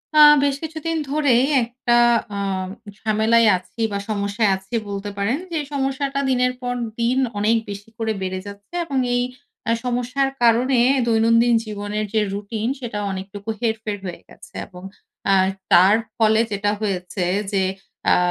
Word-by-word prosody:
আ -, -, +6 dB, 0.2 s
বেশ 280 Hz, -1 st, +2 dB
কিছুদিন 320 Hz, +1 st, -3 dB
ধরেই 275 Hz, -4 st, +3 dB, 0.2 s
একটা 240 Hz, +1 st, -1 dB, 0.4 s
আ -, -, -3 dB, 0.6 s
ঝামেলায় 220 Hz, +2 st, +3 dB
আছি 185 Hz, +5 st, -10 dB
বা 200 Hz, -, -1 dB
সমস্যায় 205 Hz, +1 st, 0 dB
আছি 190 Hz, +5 st, -7 dB
বলতে 200 Hz, 0 st, -4 dB
পারেন। 200 Hz, +7 st, 0 dB
যে 330 Hz, -, -1 dB, 0.2 s
সমস্যাটা 275 Hz, 0 st, -1 dB
দিনের 250 Hz, -1 st, +2 dB
পর 245 Hz, 0 st, -2 dB, 0.3 s
দিন 240 Hz, +2 st, +2 dB, 0.2 s
অনেক 220 Hz, +3 st, +3 dB
বেশি 205 Hz, +2 st, -8 dB
করে 225 Hz, -1 st, -1 dB
বেড়ে 185 Hz, 0 st, -3 dB
যাচ্ছে। 200 Hz, +7 st, -12 dB
এবং 275 Hz, -4 st, -3 dB, 0.2 s
এই 245 Hz, -, +2 dB, 0.5 s
আ -, -, +3 dB
সমস্যার 250 Hz, +3 st, 0 dB
কারণে 240 Hz, +2 st, +4 dB, 0.3 s
দৈনন্দিন 230 Hz, +1 st, +4 dB
জীবনের 210 Hz, 0 st, -3 dB
যে 220 Hz, -, +3 dB
রুটিন 210 Hz, +2 st, -3 dB
সেটা 230 Hz, -5 st, -4 dB
অনেকটুকু 195 Hz, +2 st, -7 dB
হেরফের 220 Hz, -2 st, -2 dB
হয়ে 175 Hz, -2 st, -6 dB
গেছে। -, -, -16 dB
এবং 180 Hz, -1 st, -12 dB, 0.4 s
অ্যা 195 Hz, -1 st, +4 dB, 0.3 s
তার 185 Hz, +4 st, +7 dB, 0.2 s
ফলে 220 Hz, 0 st, +4 dB
যেটা 205 Hz, 0 st, 0 dB
হয়েছে, 185 Hz, -2 st, -2 dB, 0.3 s
যে 195 Hz, -2 st, +1 dB, 0.4 s
অ্যা -, -, +5 dB
225 Hz, 150 wpm, -21 LUFS, 200-245 Hz, 0.6 s, তার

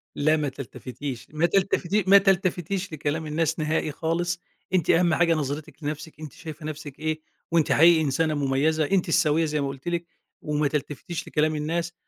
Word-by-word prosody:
لا 155 Hz, +2 st, +3 dB
ما 145 Hz, -2 st, -1 dB
تلتفتيش. 130 Hz, 0 st, -7 dB
ما 160 Hz, +3 st, +2 dB
تلتفتيش 195 Hz, +2 st, +1 dB
ما 200 Hz, -, +9 dB
تلتفتيش 190 Hz, -1 st, +1 dB
لكلام 155 Hz, +1 st, -2 dB
الناس 160 Hz, +1 st, 0 dB
نهائي 155 Hz, 0 st, 0 dB
خالص. 170 Hz, +3 st, -1 dB, 0.3 s
أنتِ 175 Hz, -4 st, +2 dB
أهم 170 Hz, -1 st, +4 dB
حاجة 170 Hz, +1 st, +3 dB
نظرتِك 150 Hz, 0 st, -4 dB
لنفسِك، 155 Hz, +1 st, -5 dB
أنتِ 155 Hz, -3 st, -8 dB
شايفة 155 Hz, -1 st, -9 dB
نفسِك 150 Hz, -2 st, -7 dB
إيه، 155 Hz, 0 st, -2 dB, 0.3 s
وأنتِ 165 Hz, -2 st, +2 dB
حقيقي 165 Hz, +1 st, +6 dB
إنسانة 155 Hz, +2 st, +1 dB
مميزة، 145 Hz, +3 st, +1 dB
أنتِ 190 Hz, -3 st, +2 dB
السويّة 160 Hz, 0 st, +3 dB
زي 150 Hz, -1 st, -1 dB
ما 140 Hz, -, -1 dB
قُلت 135 Hz, +3 st, -8 dB
لِك، 170 Hz, 0 st, -1 dB, 0.4 s
وما 150 Hz, 0 st, 0 dB
تلتفتيش 150 Hz, +3 st, -4 dB
لكلام 155 Hz, +1 st, +1 dB
الناس، 165 Hz, +3 st, -2 dB
155 Hz, 170 wpm, -25 LUFS, 150-170 Hz, 0.4 s, ما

